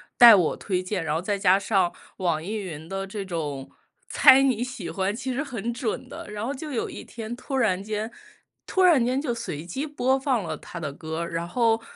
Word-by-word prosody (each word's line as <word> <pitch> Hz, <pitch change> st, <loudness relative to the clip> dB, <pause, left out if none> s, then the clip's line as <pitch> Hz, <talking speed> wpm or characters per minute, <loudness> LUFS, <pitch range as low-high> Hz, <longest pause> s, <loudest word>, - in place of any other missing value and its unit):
带 235 Hz, -3 st, +10 dB
我 175 Hz, -5 st, +2 dB
推 185 Hz, -2 st, -2 dB
荐， 185 Hz, -2 st, -2 dB
然 150 Hz, 0 st, -1 dB
后 -, -, +1 dB
再 200 Hz, +2 st, -2 dB
加 190 Hz, 0 st, +5 dB
上 195 Hz, -3 st, +1 dB, 0.3 s
网 170 Hz, -4 st, 0 dB
易 210 Hz, +5 st, -4 dB
云 165 Hz, -6 st, -6 dB
的 195 Hz, +1 st, -4 dB
这 200 Hz, 0 st, -5 dB
种 150 Hz, -6 st, -4 dB, 0.4 s
猜 270 Hz, -1 st, +7 dB
你 245 Hz, -3 st, +2 dB
喜 240 Hz, -9 st, -6 dB
欢， 195 Hz, +2 st, -1 dB
其 260 Hz, +1 st, -3 dB
实 275 Hz, +5 st, -1 dB
很 235 Hz, -4 st, -4 dB
准 240 Hz, -2 st, -3 dB
的。 -, -, -9 dB
然 210 Hz, +1 st, -4 dB
后 275 Hz, -, -2 dB
就 295 Hz, +2 st, -7 dB
有 240 Hz, -, -1 dB
一 -, -, -8 dB
天 230 Hz, 0 st, -7 dB
突 265 Hz, +2 st, -4 dB
然 195 Hz, -6 st, +1 dB
间 215 Hz, +2 st, -3 dB, 0.6 s
突 375 Hz, -, +2 dB
然 320 Hz, -9 st, +6 dB
间 255 Hz, +3 st, +1 dB
就 265 Hz, -5 st, -1 dB
随 170 Hz, -10 st, -5 dB
机 270 Hz, -, -4 dB
播 265 Hz, -2 st, +1 dB
放 260 Hz, -7 st, 0 dB
了 160 Hz, -2 st, -3 dB
他 170 Hz, +3 st, -9 dB
的 140 Hz, -4 st, -4 dB
歌， 160 Hz, +3 st, -4 dB
然 170 Hz, 0 st, -3 dB
后 225 Hz, +2 st, +2 dB
210 Hz, 235 characters per minute, -25 LUFS, 175-250 Hz, 0.6 s, 带